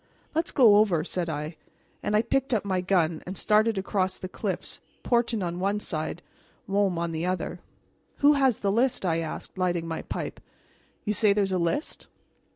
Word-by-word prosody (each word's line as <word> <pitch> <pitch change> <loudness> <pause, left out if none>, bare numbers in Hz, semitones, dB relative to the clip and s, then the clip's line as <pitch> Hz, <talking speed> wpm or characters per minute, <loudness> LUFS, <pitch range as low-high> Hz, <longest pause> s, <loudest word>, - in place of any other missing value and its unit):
"Let's 325 +1 0
go 225 -6 +6
over," 190 -7 +3
said 175 0 -2
I; 155 +1 -4 0.4
and 210 - 0
I 215 - +4
picked 265 +1 +1
up 205 - -1
my 185 -2 0
gun 175 -4 +1
and 185 +1 -5
started 215 0 +3
across 190 -1 0
the 185 - -6
cliffs, 190 -1 -4 0.2
Portin 235 -3 +1
on 175 0 -3
one 200 +2 0
side, 160 -2 -4 0.4
Môme 195 -2 +1
on 170 0 -1
the 165 +2 -2
other. 185 0 -2 0.6
"Who 290 +1 +5
has 270 -5 +3
the 200 - +1
list?" 245 0 +1
I 165 -2 +1
asked, 165 +3 -6
lighting 175 -2 0
my 165 -1 -3
pipe. - - -5 0.7
"You 210 - +1
say 205 0 +4
there 205 0 +2
is 195 - -2
a 185 - +1
list?" 170 - -2
195 Hz, 185 wpm, -27 LUFS, 175-215 Hz, 0.7 s, go